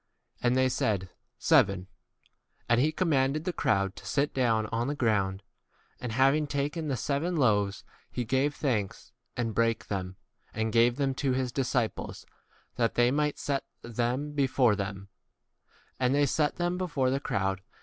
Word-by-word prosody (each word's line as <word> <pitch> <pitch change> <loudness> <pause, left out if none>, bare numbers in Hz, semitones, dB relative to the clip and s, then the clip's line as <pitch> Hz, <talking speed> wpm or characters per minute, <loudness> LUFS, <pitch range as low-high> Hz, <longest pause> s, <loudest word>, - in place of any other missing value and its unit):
And 125 +1 +2
they 130 0 +4
said, 110 -6 0
6 95 -1 -12 0.3
Seven. 95 -1 +3 0.8
And 120 +1 +4
he 155 +3 +3
commanded 150 -3 +1
the 180 - -1
crowd 100 - +1
to - - -11
sit 145 +1 0
down 115 -4 +2
on 115 +2 0
the 145 - -1
ground. 100 -6 0 0.6
And 125 -3 -4
having 135 +4 +3
taken 145 +3 -2
the 135 -3 -1
seven 150 +9 -1
loaves, 105 -8 +2 0.3
he 125 - -3
gave 135 +5 +1
thanks, 115 -5 -2 0.3
and 115 -2 -1
brake 115 0 0
[them] 95 -2 -3 0.4
and 110 0 -1
gave 120 +1 +4
[them] 135 -1 0
to 135 -3 +1
his 130 -1 -1
disciples, 125 -3 -2 0.5
that 115 -1 +1
they 120 0 +4
might 150 +1 0
set 140 -1 -1 0.2
[them] 120 +5 -2
before 130 -5 +3
[them]. 100 -1 -5 0.9
And 130 +1 +2
they 145 0 +4
7 - - -1
set 150 +1 +1
them 175 +1 -1
before 145 -8 0
the 135 - 0
crowd. 95 -6 -1
125 Hz, 165 wpm, -29 LUFS, 110-140 Hz, 0.9 s, they